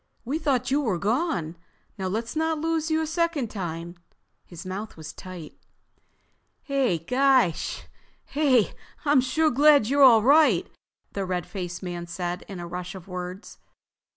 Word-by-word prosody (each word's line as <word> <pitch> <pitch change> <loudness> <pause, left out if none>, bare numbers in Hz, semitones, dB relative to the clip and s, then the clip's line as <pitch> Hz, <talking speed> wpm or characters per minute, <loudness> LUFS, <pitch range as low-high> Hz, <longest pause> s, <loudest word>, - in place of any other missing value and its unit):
"We 285 +6 -2
thought 260 -4 0
you 285 +2 +3
were 215 -10 0
gone. 200 - -1 0.4
Now 190 -2 -3
let's 225 +7 -3
not 320 0 0
lose 325 0 -1
you 315 0 +1
a - - -1
second 320 -6 -1
time." 170 -3 -5 0.5
His 175 0 -11
mouth 195 +3 -6
was 155 -1 -8
tight. 180 -5 -9 1.1
"Hey, 255 - 0 2.0
I'm 290 -2 +5
sure 310 +5 +1
glad 290 -1 +5
you're 285 +1 +2
all 235 -5 +8
right!" 275 - +5 0.5
the 200 - -2
red 180 -3 -2
faced 180 -3 -6
man 175 -1 -5
said 175 0 -4
in 195 -3 -7
a 175 - -5
rush 180 +2 -6
of 185 -2 -10
words. 180 +1 -7
210 Hz, 145 wpm, -25 LUFS, 180-285 Hz, 2.0 s, all